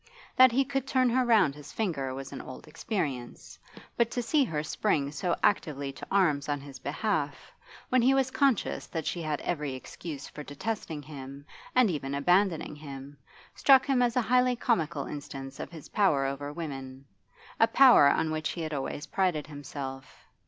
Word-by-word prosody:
That 255 -1 +8
he 270 +3 +2
could 270 0 -2
turn 255 -2 +2
her 255 +2 +3
round 220 - +4
his 145 0 -11
finger 155 -12 -2
was 135 0 -7
an - - -6
old 130 - -10
experience, 150 - -4 0.4
but 235 -1 +2
to 245 +1 -2
see 295 +4 +3
her 155 - -2
spring 150 -4 0
so 175 +4 -1
actively 145 -8 +1
to - - -10
arms 155 -8 +2
on 145 -1 0
his 140 -1 -11
behalf, 155 -1 -1 0.5
when 255 -1 +4
he 265 +3 +4
was 265 -1 +1
conscious 270 -7 +1
that 160 -3 -4
she 175 - -2
had 155 -2 -2
every 150 -6 -2
excuse 145 +2 -8
for 150 - -9
detesting 150 0 -5
him, 140 -1 -9 0.3
and 250 -6 +5
even 140 -3 -3
abandoning 175 +2 +2
him, 140 -1 -9 0.4
struck 265 -2 +5
him 270 -3 +2
as 240 -1 +2
a 250 - +3
highly 250 +2 +3
comical 170 - 0
instance 135 -2 -7
of - - -5
his 160 -4 -11
power 160 -10 +2
over 140 +1 -3
women, 135 -4 -7 0.5
a 225 - +6
power 245 - +7
on 160 +2 +1
which 155 0 -2
he 170 - -5
had 155 -1 -4
always 145 +2 -4
prided 180 -6 0
himself. 140 -2 -8
155 Hz, 180 wpm, -29 LUFS, 140-225 Hz, 0.5 s, That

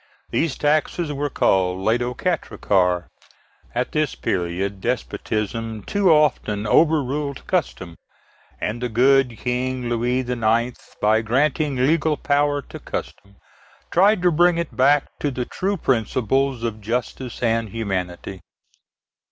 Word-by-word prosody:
These 160 -4 0
taxes 150 +1 0
were 145 +1 -2
called 95 -7 +2
l'aide 110 +5 +1
aux 125 +1 -2
quatre 175 -11 -2
cas. 90 -3 +2 0.7
At 125 +1 -1
this 155 -3 0
period 95 +2 -2
despotism 115 -2 -3
too 200 - +2
often 130 -9 +2
overruled 145 -1 +1
custom, 90 - -2 0.6
and 120 +3 -3
the 125 - -1
good 125 +1 +3
King 125 0 -2
Louis 120 +2 0
IX., 120 -1 0 0.3
by 110 +1 +4
granting 140 +5 +1
legal 150 +4 +2
power 145 0 +1
to - - -10
custom, 100 0 -7 0.6
tried 195 +2 +4
to 180 - +4
bring 175 +2 +4
it 170 -2 -3
back 140 +2 +4
to 145 - 0
the 125 -2 -3
true 195 +8 -2
principles 130 - 0
of 110 -2 -3
justice 125 +3 -4
and 115 -1 +1
humanity. 95 -3 -4
125 Hz, 125 wpm, -22 LUFS, 110-145 Hz, 0.7 s, by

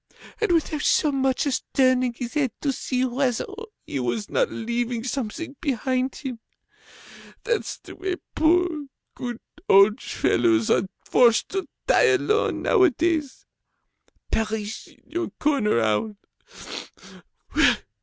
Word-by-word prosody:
And 435 -4 +2
without 315 -2 +1
so 300 - +3
much 265 -1 +1
as 280 - 0
turning 255 -2 +3
his 240 0 -6
head 285 -5 +1
to 285 - +1
see 255 0 -1
whether 250 -1 0 0.4
he 140 - -3
was 130 - -2
not - - +2
leaving 235 0 -2
something 270 +4 -4
behind 260 -2 -1
him! 255 -5 -6 1.0
That's 475 -3 -1
the - - -12
way 375 -1 -2 0.2
poor, 320 -2 +2 0.3
good 240 -2 -5 0.3
old 200 +2 +6
fellows 115 -2 +2
are 190 - +2 0.2
forced 235 -3 +4
to 385 -3 -3 0.2
die 445 -4 +5
alone, 430 +3 0
nowadays. 330 - +2 0.9
Perish 220 0 -2
in - - -22
your 350 0 -3
corner, 275 - +2
owl! 110 - 0
260 Hz, 120 wpm, -24 LUFS, 225-315 Hz, 1.0 s, old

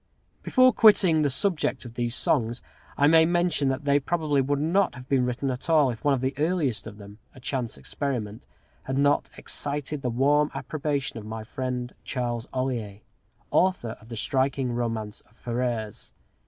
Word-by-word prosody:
Before 255 -1 +4
quitting 190 -8 +5
the 145 - +2
subject 160 +1 0
of 120 - -9
these 120 0 -1
songs, 120 -3 0 0.3
I 145 - +4
may 160 +2 +7
mention 170 -4 +1
that 135 +2 -3
they 140 0 +4
probably 150 -2 0
would 140 +2 0
not 170 +3 +1
have 125 0 -11
been 130 -2 +2
written 130 +2 -2
at 125 +6 -6
all 150 -5 +4
if 115 - -9
one 145 -1 +3
of 125 - -4
the 130 +1 -1
earliest 150 -9 0
of 105 -2 -10
them 105 +1 -12 0.2
a - - -12
chance 125 -2 -3
experiment 115 -7 -4 0.4
had 130 0 -2
not 145 +1 +2
excited 145 0 -3
the 125 - -1
warm 145 +5 +3
approbation 140 -5 -3
of 105 - -10
my 110 0 -5
friend, 125 +1 -4
Charles 120 -3 -3
Ollier, 120 -6 -3 0.5
author 180 -11 +2
of 110 - -17
the 115 - -6
striking 130 +3 0
romance 115 -3 -3
of 110 - -29
"Ferrers." 120 -3 -4
130 Hz, 175 wpm, -26 LUFS, 120-150 Hz, 0.5 s, may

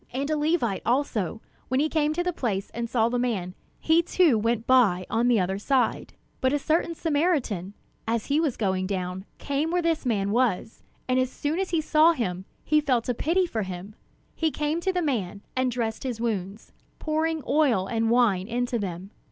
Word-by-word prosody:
And 275 +4 -2
a - - +2
Levite, 295 - 0
also, 230 - -1 0.3
when 260 +1 +1
he 305 - +2
came 305 -1 +1
to 350 +2 -1
the 360 0 -1
place, 205 -9 -2
and 235 0 -4
saw 230 -2 +2
the 245 +1 -1
man, 200 -8 -1 0.3
he 320 +1 +4
too 340 -5 +3
went 230 +1 0
by 210 -9 +4
on 230 +2 +2
the 240 -3 +4
other 190 +1 -1
side. 260 +3 0 0.3
But 260 +1 +1
a - - +3
certain 325 +3 0
Samaritan, 285 - 0 0.3
as 225 -1 0
he 285 +2 +1
was 310 -7 0
going 190 -3 0
down, 185 -1 -3
came 285 +3 -1
where 350 +1 0
this 330 -1 0
man 205 -6 0
was; 225 -3 0 0.3
and 255 0 +2
as 255 -1 +1
soon 295 +6 -2
as 385 - -1
he 335 -2 +1
saw 315 +2 +5
him, 190 - -3 0.2
he 305 0 +3
felt 255 -5 0
a - - +2
pity 340 +9 +1
for 230 -10 -3
him. 190 +1 -6 0.4
He 320 - 0
came 300 +2 -2
to 380 - +1
the 360 -1 -1
man, 205 - -2
and 255 0 +1
dressed 230 -2 -2
his 250 -4 -4
wounds, 210 -2 -3 0.3
pouring 315 0 -1
oil 275 -11 +3
and 225 +2 0
wine 220 -6 +3
into 240 0 -1
them. 190 0 -5
245 Hz, 200 wpm, -26 LUFS, 210-305 Hz, 0.4 s, saw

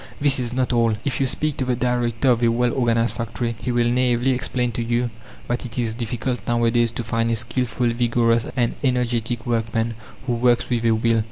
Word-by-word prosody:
This 140 -2 +4
is 120 -2 -1
not 125 0 0
all. 115 -2 +3
If 140 - -1
you 135 - +2
speak 150 +3 -2
to 130 - -1
the 125 -1 +1
director 120 0 +1
of 120 -1 +1
a 120 - +4
well 120 +1 +1
organized 115 -2 +1
factory, 115 0 -3
he 125 - -2
will 120 -1 +2
naively 125 +1 +2
explain 125 -1 -1
to 115 - -3
you 120 +1 0 0.4
that 120 +1 -2
it 120 -2 -8
is 115 -3 0
difficult 120 +1 -3
nowadays 120 0 +2
to 120 +1 -5
find 115 0 0
a 115 - +2
skilful, 120 +1 -1
vigorous, 115 -1 +2
and 120 -2 +1
energetic 120 -3 0
workman, 115 0 -1 0.3
who 125 - 0
works 120 +1 +2
with 120 -1 0
a 115 - +4
will. 115 0 +2
120 Hz, 205 wpm, -22 LUFS, 115-125 Hz, 0.4 s, This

